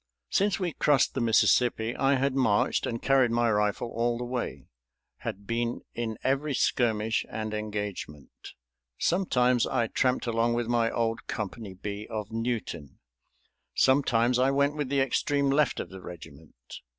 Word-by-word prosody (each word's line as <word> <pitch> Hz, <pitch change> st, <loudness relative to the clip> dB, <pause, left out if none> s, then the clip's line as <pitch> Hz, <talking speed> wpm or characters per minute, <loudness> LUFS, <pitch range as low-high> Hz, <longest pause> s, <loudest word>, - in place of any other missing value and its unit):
Since 200 Hz, 0 st, +2 dB
we 175 Hz, -4 st, -2 dB
crossed 145 Hz, -4 st, +2 dB
the 130 Hz, -, -2 dB
Mississippi 115 Hz, 0 st, +3 dB
I 135 Hz, +1 st, +2 dB
had 135 Hz, +1 st, +1 dB
marched 115 Hz, -6 st, +2 dB
and 115 Hz, -1 st, -3 dB
carried 135 Hz, -3 st, +4 dB
my 120 Hz, 0 st, +2 dB
rifle 105 Hz, +2 st, 0 dB
all 120 Hz, +1 st, 0 dB
the 125 Hz, -, -4 dB
way, 125 Hz, 0 st, -4 dB, 0.5 s
had 100 Hz, +2 st, -6 dB
been 115 Hz, +2 st, -2 dB
in 115 Hz, -2 st, -3 dB
every 140 Hz, +2 st, 0 dB
skirmish 110 Hz, -3 st, +1 dB
and 110 Hz, -1 st, -4 dB
engagement. 105 Hz, -9 st, -5 dB, 0.7 s
Sometimes 125 Hz, -9 st, +2 dB
I 120 Hz, -3 st, +1 dB
tramped 125 Hz, +3 st, 0 dB
along 115 Hz, 0 st, +1 dB
with 120 Hz, 0 st, 0 dB
my 115 Hz, -1 st, +1 dB
old 115 Hz, -1 st, -2 dB
Company 105 Hz, -1 st, -5 dB
B 105 Hz, +2 st, -6 dB
of 110 Hz, -2 st, -5 dB
Newton, 115 Hz, -, -4 dB, 0.8 s
sometimes 125 Hz, -2 st, +3 dB
I 130 Hz, +1 st, +4 dB
went 140 Hz, +1 st, +2 dB
with 145 Hz, -3 st, -3 dB
the 140 Hz, -1 st, +2 dB
extreme 140 Hz, +1 st, +1 dB
left 145 Hz, -1 st, +2 dB
of -, -, -5 dB
the 95 Hz, 0 st, -10 dB
regiment. 80 Hz, -4 st, -11 dB
120 Hz, 150 wpm, -28 LUFS, 110-130 Hz, 0.8 s, carried